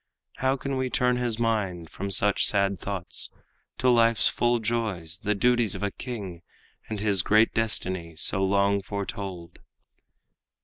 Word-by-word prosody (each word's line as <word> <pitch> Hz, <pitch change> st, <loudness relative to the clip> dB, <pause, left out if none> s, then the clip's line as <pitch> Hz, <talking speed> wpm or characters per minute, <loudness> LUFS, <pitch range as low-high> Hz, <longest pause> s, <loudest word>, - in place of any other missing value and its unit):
How 130 Hz, +1 st, +1 dB
can 135 Hz, 0 st, -3 dB
we 130 Hz, 0 st, -1 dB
turn 125 Hz, 0 st, +2 dB
his 120 Hz, -3 st, -1 dB
mind 100 Hz, -8 st, -1 dB
from 100 Hz, +1 st, -5 dB
such 100 Hz, +1 st, +4 dB
sad 100 Hz, -1 st, +1 dB
thoughts 95 Hz, -6 st, -4 dB, 0.5 s
To 130 Hz, -, 0 dB
life's 115 Hz, -1 st, +4 dB
full 120 Hz, 0 st, +1 dB
joys, 105 Hz, -7 st, -2 dB
the 105 Hz, +1 st, +1 dB
duties 120 Hz, 0 st, +2 dB
of -, -, -5 dB
a 100 Hz, -, 0 dB
king, 100 Hz, -10 st, -7 dB, 0.5 s
And 110 Hz, -2 st, -3 dB
his 100 Hz, -3 st, +1 dB
great 110 Hz, +4 st, +3 dB
destiny 95 Hz, -7 st, -1 dB
so 95 Hz, +4 st, +1 dB
long 100 Hz, +1 st, +2 dB
foretold?" 95 Hz, -3 st, -6 dB
100 Hz, 145 wpm, -26 LUFS, 95-115 Hz, 0.5 s, such